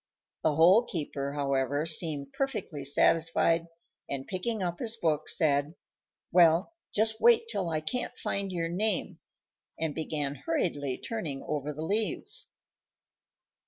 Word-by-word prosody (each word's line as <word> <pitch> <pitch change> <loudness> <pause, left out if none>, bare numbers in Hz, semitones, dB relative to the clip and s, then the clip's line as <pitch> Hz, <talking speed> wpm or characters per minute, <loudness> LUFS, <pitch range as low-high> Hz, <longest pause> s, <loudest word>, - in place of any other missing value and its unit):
The 155 -2 +2
Hole 175 +8 +7
keeper, 145 - -4
however, 140 +1 0
seemed 155 -4 +1
perfectly 225 - -3
satisfied, 165 +3 +2 0.4
and, 135 -1 -3
picking 200 +2 -2
up 175 -1 -3
his 230 -1 0
book, 155 -6 0
said, 145 -1 +1 0.6
"Well, 170 - +5 0.2
just 220 +1 0
wait 470 -1 +5
till 185 - -1
I 155 -1 -1
can't 245 +11 -3
find 195 -1 -2
your 170 -2 -1
name," 195 +4 -1 0.6
and 160 -2 -1
began 150 -3 -2
hurriedly 145 - 0
turning 160 -12 -4
over 150 -1 -2
the 150 +2 -6
leaves. 215 - -1
165 Hz, 125 wpm, -29 LUFS, 145-200 Hz, 0.6 s, Hole